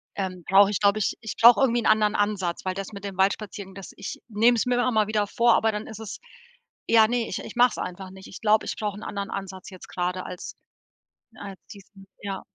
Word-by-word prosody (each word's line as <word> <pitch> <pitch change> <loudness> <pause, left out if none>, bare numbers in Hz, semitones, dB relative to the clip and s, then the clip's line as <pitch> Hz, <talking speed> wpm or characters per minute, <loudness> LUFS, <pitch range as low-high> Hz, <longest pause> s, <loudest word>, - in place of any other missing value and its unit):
ähm, 185 -2 -4
brauche 195 +1 +6
ich, 205 - -1
glaube 200 +1 +3
ich 210 - -1
ich 220 - -6
brauche 235 +2 +8
irgendwie 240 -3 +2
'n - - -7
anderen 215 -1 +3
Ansatz, 200 -5 -1
weil 185 - -1
das 195 +1 -6
mit 200 0 -8
dem 195 - -6
Waldspaziergang, 195 0 -1
das 195 -1 -9
ich - - -7
nehme 230 +2 +3
es 225 - 0
mir 250 0 +1
immer 245 +1 +1
mal 215 -2 +2
wieder 210 -1 0
vor, 235 +3 +3
aber 220 0 +2
dann 210 0 -5
ist 220 -1 -9
es 220 -2 -7 0.7
ja, 225 -1 +6
ne, 240 0 -1
ich - - -3
ich - - -9
mache 245 +1 +5
es - - -8
einfach 185 +1 -6
nicht. 190 0 -12
Ich - - -11
glaube, 215 0 +3
ich - - -4
brauche 210 -2 -3
'n - - -10
anderen 200 -1 -5
Ansatz 190 -1 -7
jetzt 185 -2 -12
grade 180 +1 -3
als 180 -1 -8 0.8
als 195 -2 -9
diesen, 195 -1 -15 0.2
ja. 195 -2 -4
205 Hz, 240 wpm, -25 LUFS, 190-220 Hz, 0.8 s, brauche